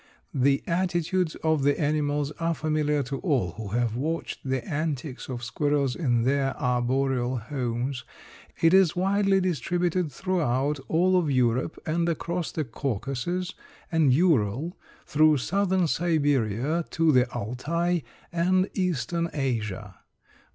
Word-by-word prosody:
The 135 +1 +2
attitudes 175 0 0
of 160 -2 +2
the 140 +1 +2
animals 150 -1 0
are 165 0 0
familiar 150 -2 0
to 135 +2 -4
all 130 - 0
who 105 +4 -7
have 115 +2 0
watched 160 +6 -3
the 130 -2 -2
antics 150 -4 -3
of 120 -2 -5
squirrels 140 +1 0
in 120 -8 +1
their 135 +2 0
arboreal 125 0 0
homes. 125 +1 -3 0.6
It 165 +1 +5
is 190 -4 +5
widely 195 +1 +2
distributed 175 0 0
throughout 150 -6 0
all 185 +3 +3
of 165 -4 -1
Europe 125 +2 +1
and 170 +2 0
across 170 +1 -2
the 155 - -2
Caucasus 135 - -3 0.4
and 160 -5 +4
Ural 145 - +2 0.3
through 155 0 +4
southern 190 +5 +1
Siberia 145 -3 +1
to 165 -1 +3
the 125 -2 +3
Altai 170 +11 -1 0.3
and 185 +2 +2
eastern 170 - -1
Asia. 115 -9 -3
150 Hz, 125 wpm, -26 LUFS, 130-170 Hz, 0.6 s, It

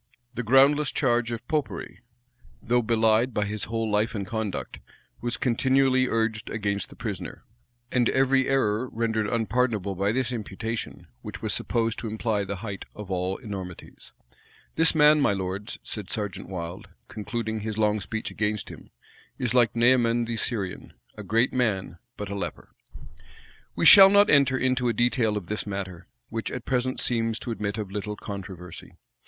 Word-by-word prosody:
The 125 - -3
groundless 135 +4 +4
charge 120 -3 +1
of 115 - -6
Popery, 150 -3 -3 0.6
though 120 +1 +1
belied 115 +1 +2
by 105 - +1
his 105 0 -3
whole 115 +1 -2
life 105 +2 0
and 100 -2 -3
conduct, 110 0 -4 0.4
was 120 -2 -2
continually 130 +1 +2
urged 110 -2 -1
against 100 -3 -2
the - - -13
prisoner; - - -6 0.5
and 125 -2 +2
every 135 0 +2
error 125 -2 +1
rendered 110 -2 -1
unpardonable 115 -3 0
by 100 +2 0
this 130 +1 0
imputation, 110 0 -5 0.2
which - - -8
was - - +1
supposed 115 -1 -1
to 115 - -5
imply 110 -1 -1
the 100 0 -4
height 100 -2 -6
of 105 -2 -8
all 95 +1 -1
enormities. 95 -7 -9 0.6
"This 165 0 +3
man, 150 0 +6
my 120 - +3
lords," 95 +2 -4
said 105 -4 -5
Serjeant 100 -3 -4
Wilde, 95 +2 -6 0.2
concluding 110 +1 -4
his 110 0 -4
long 105 -1 +2
speech 110 +3 -4
against 105 -1 -2
him, - - -12 0.5
"is 125 -2 -1
like 120 -2 +3
Naaman 120 -1 +3
the 115 0 -3
Syrian; 105 -5 -4 0.2
a 105 - -7
great 115 +6 +1
man, 100 -8 -1 0.2
but 105 -1 -5
a - - -2
leper."[*] 100 - -6 1.0
We - - 0
shall 195 -1 +11
not 205 +1 +5
enter 140 -2 +4
into 130 -1 +1
a - - +1
detail 115 -2 +1
of 100 - -5
this 105 +3 -4
matter, 95 -3 -5 0.2
which 115 -1 -3
at 125 -2 -6
present 130 0 0
seems 115 -2 0
to 120 - -5
admit 105 -1 -3
of 105 -3 -5
little 105 +1 -4
controversy. 90 -4 -8
110 Hz, 165 wpm, -26 LUFS, 105-125 Hz, 1.0 s, shall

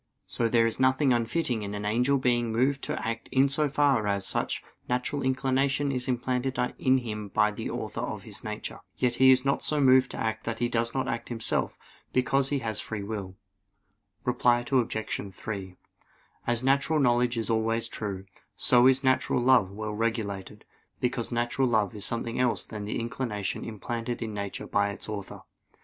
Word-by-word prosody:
So 115 -1 0
there 115 0 +4
is 115 - -1
nothing 130 +1 +3
unfitting 120 0 0
in 100 0 -4
an 105 0 -4
angel 125 +6 +2
being 120 -3 +1
moved 135 +4 +1
to - - -3
act 115 0 -4
in 135 +1 +4
so 145 +2 +1
far 135 -6 +2
as 100 -1 0
such - - -2 0.3
natural 125 +3 -1
inclination 135 +2 +1
is 125 -1 -2
implanted 125 +1 -1 0.2
in 130 0 +4
him 105 -4 -4
by 105 +2 +2
the 105 - -5
Author - - -4
of - - -4
his - - -7
nature. - - -5 0.2
Yet 125 -1 +1
he 130 - +8
is 130 0 +5
not 140 - +1
so 150 - 0
moved 130 -2 +5
to - - -7
act 110 0 -2
that 115 -1 -2
he 120 - +1
does 115 0 -1
not 130 - 0
act 120 - -3
himself, 115 -2 -1 0.4
because 135 +2 +2
he 145 - +1
has 110 -1 -1
free 110 -2 -5
will. 100 -3 -5 0.9
Reply 120 0 +2
Obj. 115 -4 0
3: 95 -2 -6 0.7
As 120 +1 0
natural 140 +4 +2
knowledge 120 -2 +2
is 115 0 0
always 115 +1 0
true, 100 -4 -5 0.3
so 125 0 +5
is 130 +1 +4
natural 130 -1 +2
love 125 -6 +4
well 105 +2 -5
regulated; 105 -3 -3 0.3
because 125 -1 -1
natural 120 +2 +1
love 110 -3 +1
is 105 -2 0
nothing 115 0 -3
else 125 -2 +2
than 105 -2 -6
the 105 - -2
inclination 115 -5 -3
implanted 115 +2 -4
in 110 -1 -5
nature 100 -1 -4
by 100 0 +1
its 100 - -8
Author. 105 -2 -6
120 Hz, 180 wpm, -28 LUFS, 110-130 Hz, 0.9 s, he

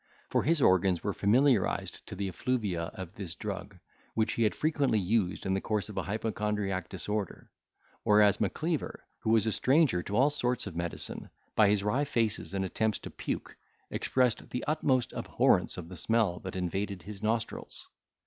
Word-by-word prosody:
For - - +3
his 155 -1 +2
organs 95 -2 +4
were 100 - -1
familiarised 120 +2 +2
to - - -7
the 100 +1 -2
effluvia 100 -5 -1
of 95 -1 -7
this 90 -5 -5
drug, - - -6 0.4
which 110 0 +1
he - - -2
had 110 -2 +3
frequently 145 -7 +1
used 100 -1 0
in 95 - +1
the 95 - 0
course 105 -1 -1
of 105 - -8
an - - -3
hypochondriac 105 -3 -2
disorder; 105 +1 -4 0.5
whereas 105 -1 +4
Macleaver, 155 - -2
who - - -2
was 110 -2 +4
a 110 - +1
stranger 130 - +3
to 100 +4 -4
all 135 +6 +4
sorts 125 -4 0
of 95 -5 -7
medicine, 85 0 -4 0.3
by 105 -2 +6
his 100 -1 +2
wry 125 +8 +1
faces 115 - -1
and 95 0 0
attempts 110 +3 0
to - - -9
puke, - - -4 0.4
expressed 125 -3 +1
the 125 - -3
utmost 130 -5 +1
abhorrence - - +2
of 85 -2 -6
the 90 - -9
smell 105 0 +1
that 95 -1 -7
invaded 95 +1 -2
his 100 0 -8
nostrils. 110 +1 -2
105 Hz, 175 wpm, -30 LUFS, 95-115 Hz, 0.5 s, by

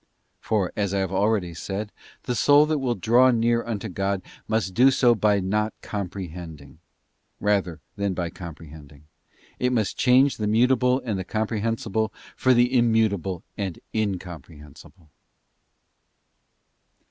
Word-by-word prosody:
For, 100 -5 -1
as 100 -2 -1
I - - +1
have 95 -1 -1
already 95 -2 0
said,* 100 +5 -5 0.3
the 125 - -2
soul 145 +5 +5
that 155 -1 0
will 125 -3 -1
draw 120 +7 +4
near 115 -1 +2
unto 110 -2 -4
God 100 0 -2 0.2
must 110 -4 -1
do 125 +6 +6
so 125 -2 +4
by 105 -2 +2
not 105 +3 -1
comprehending, 90 -7 -7 0.6
rather 95 -6 0 0.2
than 100 -2 -1
by 85 -1 -3
comprehending; 75 -4 -11 0.6
it 125 0 +1
must 110 -6 -1
change 130 +2 +4
the 105 - -2
mutable 125 +3 +3
and 105 -5 -2
the - - -3
comprehensible 110 +1 -2 0.2
for 130 -1 +3
the 120 +2 +3
Immutable 110 -7 +1 0.2
and 95 -4 -3 0.2
Incomprehensible. 85 -5 -6
105 Hz, 130 wpm, -24 LUFS, 90-115 Hz, 0.6 s, do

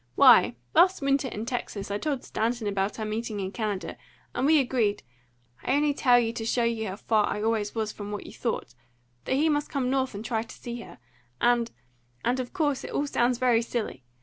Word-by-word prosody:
Why, 120 - +7 0.2
last 370 -4 +5
winter 275 0 +2
in 220 -2 -5
Texas, 210 -5 -4
I 205 - -1
told 285 -2 -2
Stanton 230 +1 -1
about 200 0 -1
our 220 - -3
meeting 215 0 -3
in 190 -1 -3
Canada, 210 -3 -3 0.4
and 260 - +1
we 315 +1 +6
agreed 245 -6 +1 0.6
I 260 - +1
only 295 0 +2
tell 250 -3 +4
you 230 -1 +1
to 230 - -4
show 235 +2 +1
you 230 -2 0
how 190 - -4
far 215 0 +1
I 210 - -2
always 220 -2 0
was 220 -1 -1
from 205 -1 -7
what 205 -1 -5
you - - -10
thought 220 - -3 0.5
that 260 - +1
he 300 +4 +3
must 295 -1 +1
come 260 -3 -1
North 265 -4 0
and 210 +3 -6
try 225 -1 0
to 225 - -10
see 240 0 -6
her, - - -12 0.4
and 240 -1 +3 0.6
and 250 +2 +1
of 250 -1 -4
course, 295 -7 0
it - - -6
all 290 - 0
sounds 245 -3 +1
very 245 -2 +3
silly! 230 - -4
235 Hz, 215 wpm, -27 LUFS, 215-260 Hz, 0.6 s, Why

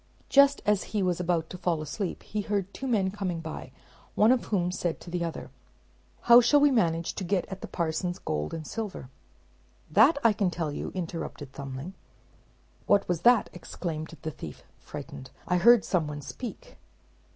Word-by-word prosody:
Just 280 0 +5
as 210 -2 +2
he 200 - +2
was 180 -2 0
about 170 -2 0
to 180 - -7
fall 175 -3 0
asleep 165 +6 -4
he 210 - -3
heard 200 -1 -2
two 270 - -5
men 200 -6 +1
coming 185 -4 -3
by, 160 -1 -7 0.4
one 215 +3 +5
of 255 -2 +2
whom 180 -4 0
said 175 -2 -2
to 175 - -11
the 175 -1 -1
other, 165 -1 -5 0.7
"How 240 +1 +8
shall 290 +5 +5
we 290 0 +5
manage 170 -9 +1
to - - -5
get 185 0 0
at 190 0 -7
the - - -6
parson's 175 +2 -2
gold 75 - -3
and 160 -1 -5
silver?" 205 - -6 0.8
"That 230 - +6
I 230 -2 +5
can 200 -2 +1
tell 165 -3 -3
you," - - -5
interrupted 165 -5 -5
Thumbling. 140 +5 -7 0.9
"What 200 - +4
was 175 -2 -1
that?" 240 +1 +4
exclaimed 165 -2 -6
the 155 - -3
thief, 80 - -9 0.2
frightened. 130 - -9 0.2
"I 180 - +2
heard 230 +1 +6
some 170 -5 0
one 145 -1 -6
speak." 245 - -8
180 Hz, 180 wpm, -28 LUFS, 160-210 Hz, 0.9 s, How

